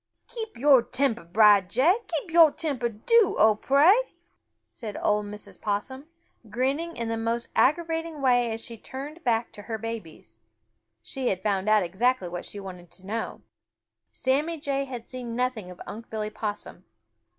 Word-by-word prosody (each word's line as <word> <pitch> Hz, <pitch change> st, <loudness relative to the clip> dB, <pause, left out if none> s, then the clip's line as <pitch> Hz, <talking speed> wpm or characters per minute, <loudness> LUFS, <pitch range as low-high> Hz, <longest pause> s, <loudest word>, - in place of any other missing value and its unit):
"Keep 445 Hz, -, -7 dB
your 270 Hz, 0 st, +6 dB
temper, 240 Hz, -3 st, -1 dB
Brer 205 Hz, +3 st, +6 dB
Jay! 255 Hz, -, +3 dB
Keep 330 Hz, 0 st, -4 dB
your 325 Hz, -2 st, +7 dB
temper, 275 Hz, -8 st, -2 dB
do, 395 Hz, -, +3 dB
Oh 215 Hz, 0 st, +6 dB
pray!" 280 Hz, -, +5 dB, 0.8 s
said 215 Hz, -4 st, -7 dB
old 210 Hz, 0 st, +1 dB
Mrs. 210 Hz, 0 st, -7 dB
Possum, 260 Hz, +8 st, -3 dB, 0.4 s
grinning 275 Hz, +9 st, -1 dB
in 230 Hz, -1 st, -3 dB
the 225 Hz, 0 st, -2 dB
most 230 Hz, +1 st, -2 dB
aggravating 325 Hz, +2 st, +1 dB
way 245 Hz, -3 st, +3 dB
as 225 Hz, 0 st, -5 dB
she 230 Hz, -1 st, -9 dB
turned 290 Hz, +8 st, -8 dB
back 235 Hz, -3 st, 0 dB
to 210 Hz, -, -11 dB
her 220 Hz, +2 st, -4 dB
babies. 195 Hz, -, -8 dB, 0.7 s
She 265 Hz, -, -4 dB
had 190 Hz, -3 st, -1 dB
found 200 Hz, -1 st, 0 dB
out 210 Hz, -4 st, +4 dB, 0.4 s
what 175 Hz, 0 st, -5 dB
she 205 Hz, -, -8 dB
wanted 180 Hz, -3 st, -9 dB
to 190 Hz, -, -14 dB
know 220 Hz, +3 st, -4 dB, 0.7 s
Sammy 295 Hz, +5 st, 0 dB
Jay 275 Hz, -1 st, -1 dB
had 245 Hz, -3 st, -8 dB
seen 245 Hz, -3 st, -6 dB
nothing 250 Hz, -6 st, -2 dB
of 180 Hz, -, -11 dB
Unc' 225 Hz, +2 st, -9 dB
Billy 215 Hz, -1 st, -3 dB
Possum. 210 Hz, -4 st, -5 dB
235 Hz, 160 wpm, -26 LUFS, 210-280 Hz, 0.8 s, your